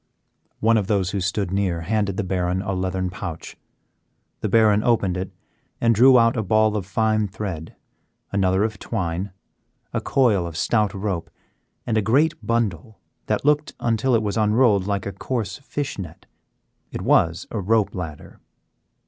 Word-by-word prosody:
One 115 +1 +4
of 100 -3 -1
those 95 -4 +1
who 100 - -2
stood 95 0 -1
near 95 -4 0
handed 100 +1 -1
the 105 - 0
Baron 90 0 -1
a 100 -2 -2
leathern 95 0 -2
pouch, 90 -4 -7 0.8
the - - -2
Baron 110 -2 +4
opened 105 -7 +2
it 90 0 -4 0.5
and 115 -1 +3
drew 125 +4 +7
out 115 -1 +4
a 115 - 0
ball 110 +1 +2
of 100 -4 -3
fine 110 +1 +1
thread, 90 -5 -6 0.6
another 95 0 +2
of 110 -2 -2
twine, 95 -2 -3 0.6
a 115 - -1
coil 120 -11 +2
of 80 -2 -7
stout 105 0 +1
rope, 95 -4 -3 0.6
and 110 -2 +1
a - - +1
great 140 +10 +3
bundle 110 -3 -2 0.3
that - - -1
looked, 150 0 +2
until 115 +2 +1
it 110 - +1
was 105 +1 -2
unrolled, 105 -2 +3
like 100 -2 -1
a 100 - -3
coarse 105 -1 -3
fish 140 -3 -4
net. 85 -4 -8 0.7
It - - -5
was 85 0 +2
a 110 - -2
rope 110 +2 +1
ladder. 80 -5 -7
100 Hz, 165 wpm, -23 LUFS, 95-115 Hz, 0.8 s, drew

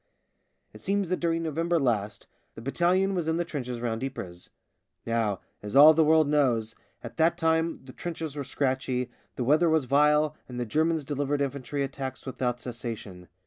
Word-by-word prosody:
It - - -13
seems 200 -2 0
that 185 - 0
during 165 -1 0
November 165 +2 0
last 105 -6 -1 0.3
the - - -9
battalion 180 +8 +2
was 175 -4 -2
in 160 0 +1
the 175 - -1
trenches 125 -7 -5
round 115 0 -2
Ypres. 90 -10 -6 0.6
Now, 115 -4 0 0.2
as 105 +2 -6
all 150 +3 +10
the 160 +1 +4
world 155 0 +4
knows, 125 -7 +1 0.3
at - - -9
that 165 +1 +3
time 160 -2 0
the 130 - -11
trenches 160 -2 -5
were 145 - -3
scratchy, 130 -2 -1 0.2
the 125 - -2
weather 155 +7 +4
was 160 -4 +2
vile, 150 +3 +3
and 125 -1 -6
the 120 - -1
Germans 160 +5 0
delivered 145 +1 -1
infantry 140 0 -2
attacks 135 -1 -5
without 125 -2 -2
cessation. 115 -7 -7
140 Hz, 175 wpm, -27 LUFS, 125-160 Hz, 0.6 s, all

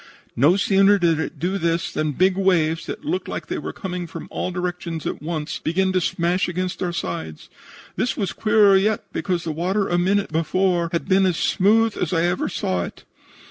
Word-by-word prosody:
No 145 +9 +4
sooner 195 +1 +4
did 170 -4 +2
it 160 0 -4
do 180 +6 -1
this 170 0 0
than 155 -1 -1
big 185 +5 +3
waves, 170 -4 +1
that - - -6
looked 350 +5 -2
like - - -5
they - - -4
were - - -5
coming 180 -3 -5
from - - -8
all - - -2
directions 175 -3 -4
at - - -3
once, 155 -1 -4
began 190 +4 0
to 185 - +2
smash 175 +3 0
against 180 +1 -3
our 180 -2 -1
sides. 85 - -5 0.5
This 245 - -1
was 200 -4 -2
queerer 210 -2 +4
yet, 205 +2 +2
because 175 -2 -1
the 165 - -3
water 185 +6 0
a 175 - +1
minute 195 +2 +1
before 170 +2 +1
was 170 +2 -3
as 180 -4 +1
smooth 220 +3 +3
as 175 - -1
I 165 -1 +2
ever 175 +1 0
saw 90 - -1
it. - - -11
180 Hz, 195 wpm, -22 LUFS, 165-195 Hz, 0.5 s, No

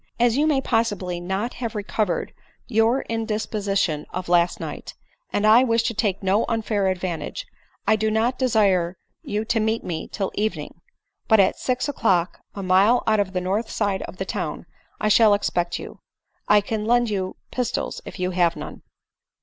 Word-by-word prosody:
As 240 -1 +3
you 295 +3 +2
may 285 -3 +2
possibly 205 -8 -1
not 190 +7 -3
have 230 -3 -3
recovered 205 -3 -2 0.3
your 230 +2 +2
indisposition 210 -7 -1
of 185 0 -5
last 175 0 +3
night, - - -7 0.4
and 205 - 0
I 225 +4 +7
wish 230 -2 +2
to 230 - -1
take 205 -3 -1
no 195 +4 +2
unfair 215 -3 0
advantages, 185 - -3 0.4
I 220 - +4
do 215 0 0
not 225 +4 0
desire 195 -8 +2 0.2
you 210 +1 -3
to 225 0 +1
meet 220 +1 0
me 165 -3 -4
till 195 -3 -3
evdfting; 215 +1 -2 0.6
but 220 -2 +5
at 190 - +3
six 255 +2 -1
o'clock, 190 -11 +1 0.2
a 200 - -5
mile 195 +6 +4
out 215 -1 +3
of 195 -2 -1
the 180 - -1
north 200 +5 -1
side 200 -3 -1
of - - -11
the 190 - -3
town, - - -4 0.3
I - - 0
shall 215 0 +6
expect 175 -4 -1
you. - - -9 0.5
I 210 0 +6
can 210 +1 -3
lend 240 0 +2
you 190 -2 -2 0.2
pistols 250 -3 -2
if - - -9
you 180 -1 -1
have 175 -2 +2
none." - - -8
210 Hz, 175 wpm, -23 LUFS, 185-225 Hz, 0.6 s, I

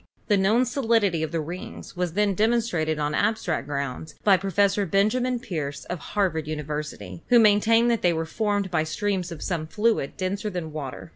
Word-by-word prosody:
The 205 - +5
known 215 +6 +3
solidity 225 - +1
of 160 -1 -2
the 165 - -1
rings 170 +4 -7
was 180 -2 -2
then 205 +1 +2
demonstrated 210 -7 +1
on 150 0 -1
abstract 190 -6 0
grounds 140 +1 -4
by 200 -2 +6
Professor 195 +2 +1
Ben 195 +4 +3
jamin 250 0 0
Peirce 150 - -5
of 180 - -3
Harvard 160 -4 -1
University, 150 - -5
who 245 - +6
maintained 225 +2 +5
that 230 - 0
they 175 - +3
were 165 -1 -1
formed 205 +2 -1
by 160 -3 +2
streams 185 +2 -2
of 165 - -7
some 165 -4 -2
fluid 210 -6 0
denser 200 +3 -2
than 175 -5 -5
water. 130 - -6
185 Hz, 185 wpm, -25 LUFS, 155-210 Hz, -, by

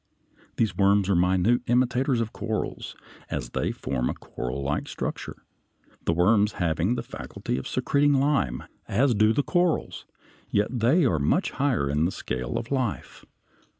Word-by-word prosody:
These 110 -3 +1
worms 100 0 +3
are - - +3
minute 95 +7 +3
imitators 125 +1 +2
of 115 -1 -4
corals, 110 0 -4 0.3
as - - -4
they - - -1
form 60 0 -2
a - - -3
corallike 70 +3 -4
structure, - - -5 0.6
the - - +2
worms 100 +5 +3
having 85 +6 0
the - - -3
faculty - - -5
of 65 - -4
secreting 145 0 +2
lime, 135 - +1 0.2
as 125 +5 +2
do 110 0 +4
the 140 +6 +1
corals, 175 +2 0 0.4
yet 105 +1 +1
they 140 +9 +4
are 85 - +2
much 70 - +1
higher 130 - 0
in 75 +3 +1
the 90 - 0
scale 65 -7 -4
of 115 - -6
life. 130 -6 -3
110 Hz, 150 wpm, -26 LUFS, 85-125 Hz, 0.6 s, do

